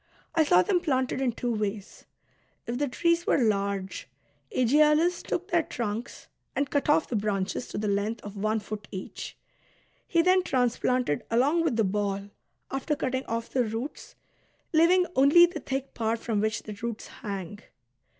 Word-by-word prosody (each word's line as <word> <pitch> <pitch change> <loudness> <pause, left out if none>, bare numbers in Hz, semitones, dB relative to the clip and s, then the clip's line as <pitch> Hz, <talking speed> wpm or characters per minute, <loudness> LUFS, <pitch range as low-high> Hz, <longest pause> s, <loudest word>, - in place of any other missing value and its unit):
I 320 - +4
saw 180 -9 +5
them 360 - +2
planted 260 -6 0
in 260 -2 +2
two 240 +1 -2
ways. 210 -1 -4 0.6
If 240 +2 -3
the 290 - +1
trees 335 +6 +1
were - - +4
large, 200 -5 -1 0.4
Aegialus 300 +7 +3
took 365 +3 -3
their 340 -1 +4
trunks 235 -4 -5 0.3
and 280 -1 -1
cut 285 0 0
off 315 +1 +4
the 240 - -3
branches 200 +1 -1
to - - -6
the 210 - -1
length 205 +3 0
of 205 0 -8
one 215 +2 0
foot 210 0 -7
each; 190 -2 -7 0.7
he 335 -1 +3
then 370 +1 +5
transplanted 250 - 0
along 280 +9 +3
with 310 -8 +1
the 225 - +3
ball, 200 0 -1 0.4
after 270 +3 -1
cutting 260 -1 -2
off 230 0 -3
the 255 - +2
roots, 225 +5 -5 0.6
leav 325 +2 +5
ing 365 0 +4
only 285 +6 +7
the 345 - -5
thick 270 0 -4
part 225 0 0
from 220 -3 -1
which 220 +1 -1
the 215 - -7
roots 235 -2 -4
hang. 200 -2 -6
240 Hz, 170 wpm, -27 LUFS, 210-295 Hz, 0.7 s, only